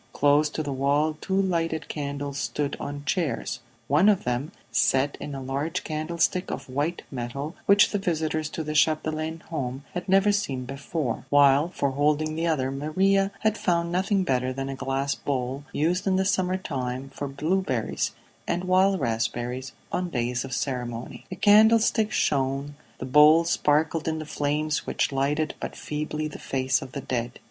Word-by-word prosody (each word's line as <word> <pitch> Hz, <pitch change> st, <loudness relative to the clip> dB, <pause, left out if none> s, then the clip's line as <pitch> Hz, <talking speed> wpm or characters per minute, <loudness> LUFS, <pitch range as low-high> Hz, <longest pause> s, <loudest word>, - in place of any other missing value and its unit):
Close 145 Hz, +1 st, +4 dB
to 155 Hz, -, -3 dB
the 145 Hz, -2 st, -3 dB
wall 145 Hz, +3 st, +1 dB
two 190 Hz, 0 st, 0 dB
lighted 165 Hz, -4 st, 0 dB
candles 140 Hz, -1 st, -4 dB
stood 145 Hz, -1 st, -2 dB
on 145 Hz, 0 st, -6 dB
chairs; 170 Hz, -2 st, -1 dB, 0.3 s
one 155 Hz, +10 st, +5 dB
of 200 Hz, -3 st, +2 dB
them 125 Hz, +4 st, -2 dB, 0.2 s
set 130 Hz, +4 st, +2 dB
in 145 Hz, -, -5 dB
a 135 Hz, -, -5 dB
large 150 Hz, +8 st, -2 dB
candlestick 170 Hz, +3 st, -1 dB
of -, -, -5 dB
white 145 Hz, +6 st, -2 dB
metal 140 Hz, +6 st, -5 dB
which 200 Hz, +1 st, +6 dB
the 205 Hz, -, 0 dB
visitors 155 Hz, -4 st, -1 dB
to 160 Hz, -, -4 dB
the 155 Hz, 0 st, -4 dB
Chapdelaine 155 Hz, +1 st, +1 dB
home 135 Hz, -4 st, -4 dB
had 180 Hz, +2 st, -5 dB
never 195 Hz, +2 st, +5 dB
seen 140 Hz, -12 st, -1 dB
before, 135 Hz, -1 st, -4 dB
while 145 Hz, +2 st, +5 dB
for 140 Hz, -6 st, -1 dB
holding 150 Hz, +3 st, +1 dB
the 165 Hz, +1 st, -1 dB
other 135 Hz, -5 st, 0 dB
Maria 190 Hz, +8 st, +1 dB
had 220 Hz, 0 st, +1 dB
found 170 Hz, -1 st, +1 dB
nothing 190 Hz, +2 st, +1 dB
better 130 Hz, -5 st, 0 dB
than 135 Hz, +1 st, -4 dB
a 135 Hz, -, -4 dB
glass 135 Hz, +1 st, -1 dB
bowl 135 Hz, 0 st, -3 dB
used 175 Hz, +6 st, 0 dB
in 190 Hz, -, +3 dB
the 190 Hz, 0 st, +2 dB
summer 185 Hz, -2 st, +1 dB
time 130 Hz, -6 st, -4 dB
for 145 Hz, -, -4 dB
blueberries 140 Hz, -, -1 dB, 0.4 s
and 175 Hz, -, -1 dB
wild 185 Hz, +1 st, +3 dB
raspberries, 120 Hz, +3 st, -2 dB, 0.2 s
on 180 Hz, -1 st, -1 dB
days 120 Hz, -3 st, -1 dB
of 135 Hz, -, -8 dB
ceremony. 125 Hz, -3 st, -4 dB
The 185 Hz, -, -5 dB
candlestick 220 Hz, +2 st, +5 dB
shone, 140 Hz, -3 st, 0 dB, 0.2 s
the -, -, -5 dB
bowl 150 Hz, +5 st, +7 dB
sparkled 160 Hz, 0 st, +1 dB
in 160 Hz, 0 st, 0 dB
the 155 Hz, -, -5 dB
flames 150 Hz, 0 st, -1 dB
which -, -, 0 dB
lighted 145 Hz, +3 st, 0 dB
but -, -, -5 dB
feebly 150 Hz, 0 st, -3 dB
the 150 Hz, -, -9 dB
face 130 Hz, 0 st, 0 dB
of 130 Hz, -1 st, -9 dB
the 140 Hz, -, -4 dB
dead. 120 Hz, -1 st, -3 dB
150 Hz, 170 wpm, -26 LUFS, 135-170 Hz, 0.4 s, bowl